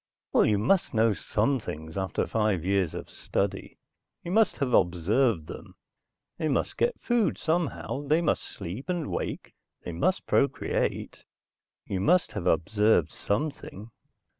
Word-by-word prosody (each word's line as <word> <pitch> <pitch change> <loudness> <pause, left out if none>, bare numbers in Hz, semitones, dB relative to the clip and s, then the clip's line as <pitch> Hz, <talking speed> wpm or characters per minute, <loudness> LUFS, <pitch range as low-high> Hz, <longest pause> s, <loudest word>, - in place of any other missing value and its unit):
"Well - - +5
you 105 - +3
must 130 - +1
know 110 0 +4
some 110 +7 0
things 80 -6 -7
after 95 -1 -1
five 105 -6 0
years 95 -4 +1
of - - -6
study. - - -3 0.5
You 170 - -5
must 220 +2 +3
have 130 -4 -1
observed 90 - +2
them. - - -10 0.6
They 155 - 0
must 140 - 0
get 485 +1 0
food 240 -4 +1
somehow, 160 -3 -2
they 155 +3 +4
must 170 - +1
sleep 105 - -7
and 175 -4 -2
wake, - - -4 0.3
they - - -4
must 85 +1 0
procreate. - - 0 0.6
You 95 - -3
must 175 - +3
have 100 -5 -4
observed 90 -1 +3
something." 110 -2 -3
110 Hz, 140 wpm, -27 LUFS, 95-155 Hz, 0.6 s, Well